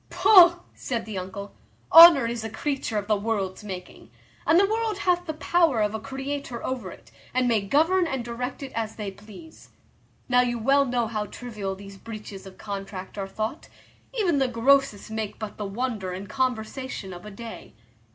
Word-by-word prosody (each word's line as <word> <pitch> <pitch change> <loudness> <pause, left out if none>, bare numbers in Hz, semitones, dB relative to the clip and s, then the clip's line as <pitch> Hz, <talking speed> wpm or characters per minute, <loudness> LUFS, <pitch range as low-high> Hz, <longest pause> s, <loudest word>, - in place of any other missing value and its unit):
"Pugh!" 350 -4 +7 0.2
said 235 -3 -4
the 210 -4 -4
uncle, 195 +2 -7 0.4
"honour 330 -6 +10
is 230 -1 -3
a 225 - -4
creature 260 0 -3
of 205 - -2
the 215 0 +2
world's 200 -2 -2
making, 185 -3 -9 0.4
and 325 +2 +6
the 395 - +5
world 440 0 -1
hath 355 -2 0
the 315 - -2
power 330 -6 +2
of 210 0 +1
a 220 - -3
creator 270 +1 -5
over 250 -7 -3
it, - - -14 0.2
and 255 -1 +2
may 225 -3 +2
govern 325 - +2
and 265 -5 -3
direct 250 +3 -5
it 270 - -7
as 225 -1 -3
they 205 -3 -5
please. 215 - -14 0.6
Now 250 -1 +4
you 240 -1 -1
well 275 +5 +3
know 245 -2 0
how 215 -2 -3
trivial 210 -6 -6
these 195 0 -11
breaches 210 -2 -9
of 190 - -13
contract 195 -2 -7
are 195 -2 -4
thought; 220 +8 -5 0.4
even 385 - +1
the 265 - +2
grossest 245 -2 +2
make 220 -1 -4
but 215 -2 -7
the 210 - -4
wonder 205 -3 -3
and 190 +2 -7
conversation 255 -4 -3
of 175 - -10
a 210 - -8
day. 225 +2 -10
230 Hz, 185 wpm, -25 LUFS, 205-275 Hz, 0.6 s, honour